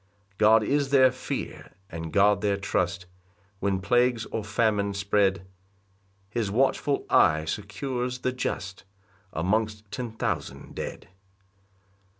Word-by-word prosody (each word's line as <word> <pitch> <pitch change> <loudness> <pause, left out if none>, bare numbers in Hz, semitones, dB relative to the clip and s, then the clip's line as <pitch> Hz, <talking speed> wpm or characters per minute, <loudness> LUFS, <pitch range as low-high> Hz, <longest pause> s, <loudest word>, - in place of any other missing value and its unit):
5 100 - -35
God 110 +1 +6
is 140 +4 +1
their 130 -2 +6
fear, 125 - -6 0.2
and 80 -1 -5
God 100 +3 +4
their 100 -1 +1
trust, 90 -2 -1 0.5
When 100 -1 0
plagues 120 +3 +2
or 110 - -2
famine 105 -1 +1
spread, 100 -1 +1 0.9
His 115 -3 -1
watchful 135 +5 +1
eye 80 -3 +4
secures 120 - -3
the 130 - -1
just 100 -7 -4 0.5
Amongst 105 +4 -1
ten 120 0 -4
thousand 110 - -4
dead. - - -6
105 Hz, 120 wpm, -27 LUFS, 100-120 Hz, 0.9 s, God